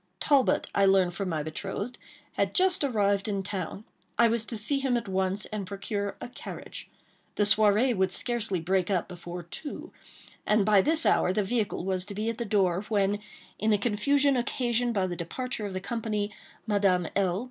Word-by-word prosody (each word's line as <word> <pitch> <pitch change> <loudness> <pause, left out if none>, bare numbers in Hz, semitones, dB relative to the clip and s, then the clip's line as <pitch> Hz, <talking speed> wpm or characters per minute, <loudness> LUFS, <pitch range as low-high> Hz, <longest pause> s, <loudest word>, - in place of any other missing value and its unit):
Talbot, 280 -3 +3
I 200 - +3
learned 190 -2 +4
from 195 +1 -3
my 155 -3 -1
betrothed, 200 +9 -5 0.3
had - - -1
just 370 -4 +3
arrived 205 -6 +1
in 200 -2 -1
town. 190 0 -5 0.3
I 235 -1 +5
was 225 -1 0
to 230 - -3
see 275 +7 +2
him 265 -3 +1
at 230 -2 -4
once, 190 +1 0
and 210 -3 -5
procure 200 +1 -4
a - - -6
carriage. 245 - -9 0.5
The 210 - +2
soirée 215 +4 +4
would 190 -1 +1
scarcely 225 -3 0
break 185 +2 0
up 185 -3 0
before 175 -1 -7
two; 290 - -6 0.5
and 210 -1 +2
by 205 -2 +5
this 320 +7 +2
hour 180 - +3
the 205 +2 +1
vehicle 205 -3 -1
was 185 -1 -1
to 200 0 -7
be 215 +2 -1
at 230 - -10
the 235 - -2
door; 190 -4 +2
when, 205 -1 +1 0.4
in 215 - +1
the 210 - +4
confusion 265 +7 +2
occasioned 240 -1 0
by 195 -2 +2
the 180 -1 -3
departure 215 +6 -4
of 195 - -7
the 185 - -2
company, 210 0 -2 0.3
Madame 195 -5 +2
L. 190 -2 +1
205 Hz, 190 wpm, -28 LUFS, 190-235 Hz, 0.5 s, I